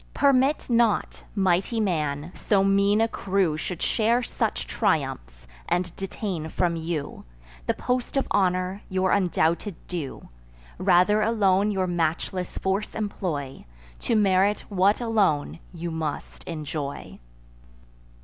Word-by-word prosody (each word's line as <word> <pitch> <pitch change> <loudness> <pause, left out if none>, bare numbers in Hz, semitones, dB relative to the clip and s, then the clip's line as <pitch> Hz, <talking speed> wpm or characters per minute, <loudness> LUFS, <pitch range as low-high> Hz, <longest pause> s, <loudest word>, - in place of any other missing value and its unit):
Permit 275 +1 +3
not, 235 -3 +1
mighty 190 +3 +1
man, 155 -6 -1
so 195 -2 +1
mean 200 +2 +3
a 225 - +4
crew 190 -7 0
Should 165 +2 -4
share 235 +2 +2
such - - -2
triumphs, - - -1 0.2
and 180 -1 0
detain 190 -4 -4
from 170 +1 0
you 160 -3 -4 0.4
The - - +1
post 250 +2 -2
of 270 - +2
honour, 185 +1 +1
your 185 -1 +1
undoubted 180 0 +1
due. 165 -7 -5 0.5
Rather 185 +3 +4
alone 205 -3 +3
your 190 -2 0
matchless 175 +1 -2
force 195 +2 -1
employ, 170 -10 -3 0.4
To 230 - 0
merit 200 0 +3
what 200 +1 +3
alone 190 - +1
you 170 -1 -5
must 160 -2 -5
enjoy." 150 -3 -5
185 Hz, 120 wpm, -25 LUFS, 165-210 Hz, 0.5 s, a